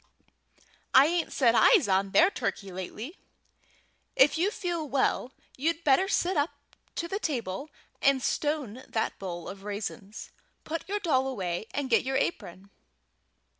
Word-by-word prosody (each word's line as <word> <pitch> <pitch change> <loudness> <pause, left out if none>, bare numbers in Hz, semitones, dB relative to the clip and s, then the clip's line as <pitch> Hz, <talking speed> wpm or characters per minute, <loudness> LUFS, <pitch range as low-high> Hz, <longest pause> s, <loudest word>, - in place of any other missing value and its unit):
I 265 - +9
ain't 335 +1 0
set 240 -4 +3
eyes 335 - +5
on 195 0 +2
their 345 - +5
turkey 195 - -3
lately. 210 - -7 1.0
If 270 +2 +5
you 350 +5 +2
feel 345 -7 -3
well, 260 -1 +1 0.3
you'd 330 +5 -1
better 295 +6 +4
sit 370 -1 +1
up 290 +1 +2 0.5
to 335 - -2
the 390 +4 -3
table 255 - -3 0.3
and 275 -1 +4
stone 285 -6 -1
that 220 - -2
bowl 175 -3 -6
of 195 0 -8
raisins. 205 0 -6 0.3
Put 330 +4 -5
your 415 +1 -1
dolly 265 -8 +1
away, 185 -6 -3
and 285 -2 -2
get 240 - +3
your 265 0 0
apron." 195 - -3
265 Hz, 145 wpm, -28 LUFS, 205-325 Hz, 1.0 s, I